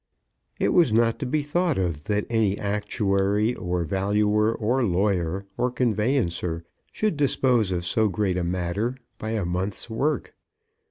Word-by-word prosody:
It - - +2
was 170 -9 +4
not 115 +1 +2
to 135 - -3
be 150 +3 0
thought 170 +2 0
of 85 -6 -2
that 105 0 0
any 110 -4 +1
actuary, 105 +1 0
or 90 -4 -2
valuer, 105 +5 +1
or 120 +3 0
lawyer, 95 -2 0
or 125 - +2
conveyancer, 105 -9 0 0.3
should 215 -5 0
dispose 130 -7 +2
of 90 -1 -2
so 110 +4 +2
great 95 -1 0
a 90 - -1
matter 90 +8 -1 0.2
by 110 +1 -3
a 105 -5 -1
month's 95 +6 -3
work. 145 +7 -1
105 Hz, 150 wpm, -25 LUFS, 95-120 Hz, 0.3 s, was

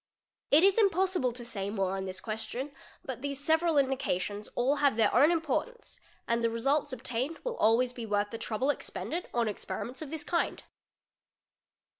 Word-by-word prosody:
It 305 +4 +6
is 395 +3 +5
impossible 370 - +2
to 240 0 -6
say 200 -4 -4
more 195 -2 -1
on 190 0 -3
this 185 0 -3
question, 225 +6 -4 0.3
bu 260 -3 -4
these 280 +1 -4
several 320 +2 +2
indications 210 -7 0
all 265 +4 +2
have 280 -4 +3
their 220 -2 +3
own 295 - +6
importance 340 - -2 0.3
and 235 0 +1
the 230 - +3
result 275 +6 +1
obtained 255 +5 -2
will - - -2
always 245 +3 +3
be 235 -2 -6
worth 205 0 0
the 230 - -5
trouble 255 +6 0
expended 345 +4 -4
on 235 -2 +1
experiments 215 +5 -4
¢ 310 - -6
this 315 0 -4
kind. 340 - -1
255 Hz, 170 wpm, -30 LUFS, 225-305 Hz, 0.3 s, It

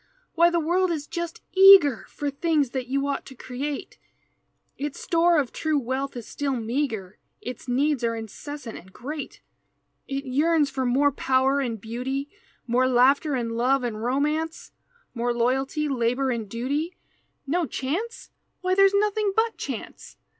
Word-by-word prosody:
Why 340 +1 +5
the 345 0 +1
world 355 +4 +1
is 310 -4 -2
just 340 +1 -5
eager 375 - +7
For 290 -1 -3
things 295 -2 +1
that 255 -1 -3
you 275 +2 0
ought 280 -1 -2
to 265 - -11
create 270 +4 -5 0.8
Its 290 0 -5
store 340 0 +3
of 275 -5 0
true 310 -2 0
wealth 265 +1 -2
is 235 - -7
still 280 -2 -2
meagre 225 -5 -3 0.2
Its 250 +1 -8
needs 270 +1 +1
are 230 0 +1
incessant 230 +3 -7
and 190 - -17
great, 290 +8 -7 0.7
It 275 +1 -3
yearns 295 +2 +2
for 260 -1 -1
more 280 +4 +3
power 265 +1 +2
and 235 -5 -2
beauty 255 +6 -4 0.3
More 250 +1 +2
laughter 265 +4 +4
and 235 -2 -2
love 250 +3 +2
and 220 -3 -3
romance, 300 +6 -1 0.4
More 240 0 -1
loyalty, 265 +5 0
labor 255 0 0
and 225 -4 -3
duty, 285 - -2 0.5
No 330 +3 0
chance 355 - -4 0.3
why 370 0 +1
there's 390 +1 +5
nothing 420 0 +1
but 450 0 +2
chance! - - -7
275 Hz, 155 wpm, -25 LUFS, 245-315 Hz, 0.8 s, eager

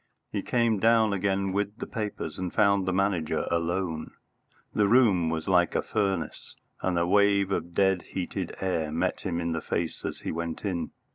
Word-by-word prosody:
He - - -1
came 115 -4 +1
down 110 -1 +4
again 95 0 0
with 100 +1 -1
the - - -5
papers, 105 -8 -4
and 90 -2 -3
found 100 -2 +3
the - - +2
Manager 95 -4 0
alone. 85 -1 -1 0.6
The 105 -1 +3
room 100 -8 +4
was 80 -1 -3
like 90 -2 +3
a - - +1
furnace, 95 -5 -2 0.3
and 90 -2 0
a 85 - +2
wave 100 +1 +3
of 85 -2 -2
dead 95 -2 +3
heated 90 -2 -4
air 85 -5 -1
met - - 0
him 85 - -2
in 85 0 -1
the 80 -1 -2
face 85 -1 -3
as - - -4
he - - -3
went 85 +3 -4
in. 90 -4 -2
95 Hz, 185 wpm, -27 LUFS, 85-100 Hz, 0.6 s, down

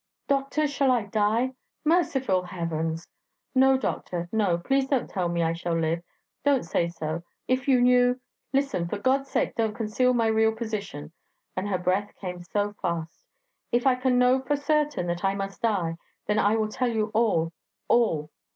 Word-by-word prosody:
'Doctor, 275 +2 +1
shall 280 -1 +1
I 245 -3 +3
die?' 220 +5 +1 0.3
'Merciful 270 - +2
Heavens!' 165 -2 -3 0.5
'No, 265 0 +5
doctor, 175 -9 -3
no; 205 -6 +2
please 270 +10 +1
don't 270 -3 0
tell 180 -3 -2
me 170 0 0
I 165 0 +1
shall 170 0 -2
live... 165 +1 0 0.4
don't 285 -2 +3
say 170 +1 +1
so... 165 -1 -4 0.3
If 255 0 0
you 260 -2 +5
knew... 250 0 +4 0.3
Listen! 270 -11 0
for 205 - -3
God's 270 +5 +1
sake - - 0
don't 220 -3 -1
conceal 245 +3 +1
my 230 -1 +2
real 220 0 +3
position,' 210 -10 -5 0.4
and 190 +2 -2
her 190 - +1
breath 185 +3 -1
came 180 -2 -5
so 205 +4 -1
fast. 165 -1 -4 0.4
'If 240 +2 +1
I 265 - +6
can 255 0 +1
know 250 +1 +4
for 265 +3 0
certain 295 - 0
that 175 +1 -3
I 195 0 +2
must 195 0 -5
die... 185 -8 0 0.3
then 210 0 +1
I 205 +1 +3
will 220 -1 +1
tell 250 +2 0
you 220 -2 -1
all 195 -8 +2 0.3
all!' 165 -11 +2
215 Hz, 175 wpm, -26 LUFS, 175-255 Hz, 0.5 s, I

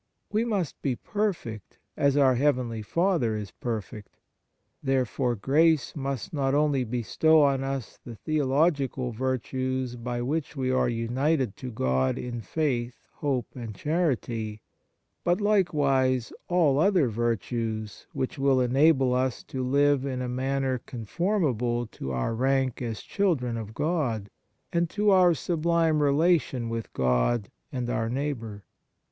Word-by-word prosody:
We 220 +2 +1
must 200 - -2
be 135 -3 0
perfect 170 - -3 0.2
as 140 0 +2
our 135 -2 +5
heavenly 125 -4 +1
Father 165 - +1
is 105 -3 -6
perfect. 105 -3 -6 0.6
Therefore 130 -2 0
grace 150 +7 +2
must 135 -2 -4
not 135 -2 +1
only 145 -3 +2
bestow 125 +7 +3
on 135 -1 +2
us 135 -3 -4
the 120 - -8
theological 140 -2 +1
virtues 130 +1 -2
by 120 0 -3
which 150 +4 -2
we 130 -2 0
are 130 - +2
united 120 +1 0
to 130 - -6
God 65 - 0
in 120 -1 -5
faith, 120 0 -2
hope, 135 -4 -1
and 115 -4 -6
charity, 120 - -1 0.6
but 175 +2 +2
likewise 140 - +2
all 160 -6 +3
other 180 -4 +4
virtues 115 -1 -2
which 130 +2 -3
will 135 -1 +3
enable 135 +1 +4
us 130 -1 0
to 130 -1 -4
live 140 +1 +3
in 130 -2 -3
a 125 - -2
manner 130 +1 -1
conformable 125 - -1
to 65 -11 -7
our 65 - -1
rank 130 +1 +1
as 115 -3 -4
children 150 -12 0
of 110 -1 -6
God, 130 - -1 0.4
and 170 -1 +1
to 210 +2 +2
our 180 -3 +5
sublime 165 0 +1
relation 145 -4 +2
with 115 -1 -4
God 65 - +1 0.2
and 125 -3 -3
our 115 -2 -1
neighbour. 120 -6 -3
130 Hz, 135 wpm, -27 LUFS, 120-150 Hz, 0.6 s, our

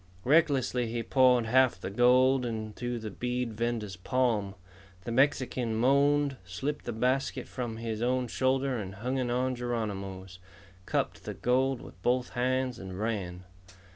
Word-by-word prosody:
Recklessly 135 -5 +3
he 115 +1 -3
poured 125 0 +4
half 125 -2 +3
the 95 - -5
gold 125 +3 +4
into 115 +1 -4
the 110 -2 -6
bead 125 +2 -2
vendor's 110 -3 -2
palm. 105 -1 0 0.5
The 115 - -4
Mexican 125 -2 +1
moaned, 140 +3 +3
slipped 130 +12 -4
the 120 - -2
basket 125 +4 -1
from 120 -3 -5
his 115 -1 -4
own 125 +1 +1
shoulder 130 +1 0
and 95 -3 -6
hung 125 +6 -2
it 125 -1 -1
on 130 +1 0
Geronimo's, 100 -6 -4 0.5
cupped - - -2
the - - -5
gold 130 +1 +1
with 90 - -13
both 125 +3 +1
hands, 130 0 -1
and 95 -1 -7
ran. 95 -5 -3
120 Hz, 145 wpm, -29 LUFS, 110-130 Hz, 0.5 s, poured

